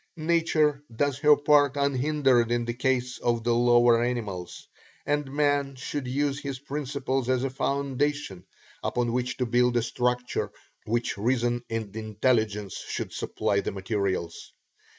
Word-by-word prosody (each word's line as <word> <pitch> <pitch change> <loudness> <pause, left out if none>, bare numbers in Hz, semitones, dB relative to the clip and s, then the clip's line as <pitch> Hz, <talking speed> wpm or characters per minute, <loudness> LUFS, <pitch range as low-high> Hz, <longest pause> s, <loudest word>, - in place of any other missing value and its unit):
Nature 155 -3 +2
does 140 +2 0
her 150 0 +6
part 145 -1 +3
unhindered 140 -3 +2
in 120 0 +1
the 120 - -2
case 125 0 -1
of 120 -1 0
the 120 0 +2
lower 120 0 +5
animals, 105 -8 -4 0.4
and 145 -2 -1
man 145 -1 +1
should 130 +1 -4
use 140 +2 -1
her 140 -1 -4
principles 135 -3 -2
as 130 0 +2
a 135 - -1
foundation 140 -6 -1 0.4
upon 120 -1 -1
which 125 0 -1
to 125 - 0
build 120 +1 +2
a 120 - +2
structure 125 +1 -1 0.3
which 115 -2 -1
reason 120 +1 +1
and 110 -3 -4
intelligence 110 -2 0
should - - -5
supply 100 - -1
the - - -3
materials. 95 -3 -3
125 Hz, 140 wpm, -27 LUFS, 115-140 Hz, 0.4 s, her